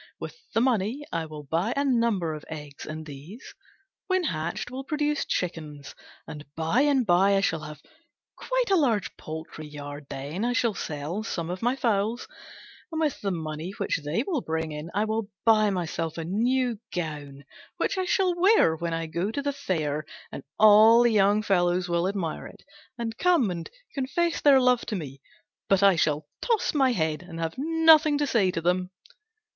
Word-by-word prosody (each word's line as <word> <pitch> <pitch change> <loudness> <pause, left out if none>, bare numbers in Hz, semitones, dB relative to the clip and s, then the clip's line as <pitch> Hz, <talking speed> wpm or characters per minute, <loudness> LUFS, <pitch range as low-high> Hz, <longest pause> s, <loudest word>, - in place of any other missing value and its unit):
With - - -7 0.2
the 225 - +4
money 245 +3 0
I 165 -1 -2
will 150 -1 -9
buy 165 - -1
a 280 - +1
number 230 - +1
of 155 0 -8
eggs, 150 -3 -8
and 155 0 -6
these, 155 - -11 0.5
when 375 -1 +1
hatched, 170 - -3
will 265 +1 -5
produce 295 +1 -1
chickens, 150 -5 -4 0.3
and 150 -2 -8
by 165 +10 +1
and 280 -4 +3
by 195 +1 +4
I 195 - +3
shall 165 -4 0
have 150 -1 -10 0.5
quite - - -1
a - - +6
large 235 - +1
poultry 155 0 -8
yard. 145 -1 -8
Then 145 +9 -5
I 245 +1 +1
shall 235 -3 +1
sell 155 +3 -4
some 175 -6 -4
of 180 - -5
my 245 +3 +1
fowls, 230 -2 0 0.6
and 320 - -3
with 305 -4 -1
the 200 - -1
money 160 0 -4
which 200 - -2
they 155 - -1
will 305 -4 -2
bring 160 -2 -3
in 150 +2 -6
I 210 +1 +2
will 220 -1 -2 0.2
buy 215 -2 +5
myself 165 -3 -3
a 165 - -4
new 240 +5 0
gown, 145 -5 -5 0.3
which - - 0
I 375 -1 -1
shall 365 0 +2
wear 355 - +4
when 170 0 -3
I 165 0 -3
go 170 +5 -2
to 255 +6 -3
the 285 0 -1
fair; 155 - -2 0.3
and - - -6 0.2
all 215 +2 +7
the 240 - +4
young 205 0 +3
fellows 180 -2 +1
will 170 +1 +1
admire 190 -5 -3
it, - - -16 0.3
and 230 -1 -4
come 335 - +3
and 170 -2 -6 0.5
make 345 -1 +1
love 255 -4 +5
to 215 - -2
me, 140 -6 -7 0.5
but 195 0 +4
I 195 -2 +6
shall 150 -2 0
toss 460 -3 +1
my 270 -4 +3
head 160 -7 -1
and 175 -2 -9
have 165 -1 -2
nothing 315 -1 +5
to 290 - +1
say 220 -9 +2
to 180 -2 -2
them." 180 +2 0
195 Hz, 185 wpm, -26 LUFS, 160-250 Hz, 0.6 s, all